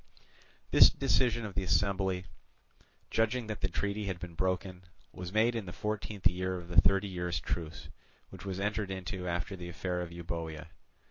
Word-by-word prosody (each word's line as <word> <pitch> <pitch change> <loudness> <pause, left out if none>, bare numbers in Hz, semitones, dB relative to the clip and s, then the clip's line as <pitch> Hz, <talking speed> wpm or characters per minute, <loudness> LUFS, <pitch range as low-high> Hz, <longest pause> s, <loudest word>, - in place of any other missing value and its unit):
This - - +10
decision 120 -3 +2
of 100 - -6
the 95 - 0
assembly, 95 0 +1 0.9
judging 115 +2 +2
that 110 -1 -5
the - - +2
treaty 100 +3 -2
had 95 -3 -2
been 85 -1 -7
broken, 95 +1 -1 0.3
was 90 0 -6
made 110 +3 +4
in 115 -5 -3
the - - -5
fourteenth 105 0 -4
year 95 0 +2
of 85 -1 -9
the 90 - +7
thirty 95 +2 +3
years' 90 -3 -2
truce, 80 -3 -4 0.4
which - - -10
was 95 -1 -3
entered 100 0 -1
into 95 -1 -4
after 90 +3 -2
the 90 -1 -7
affair 90 +1 -2
of 85 -1 -5
Euboea. 80 -2 -5
95 Hz, 175 wpm, -32 LUFS, 90-100 Hz, 0.9 s, This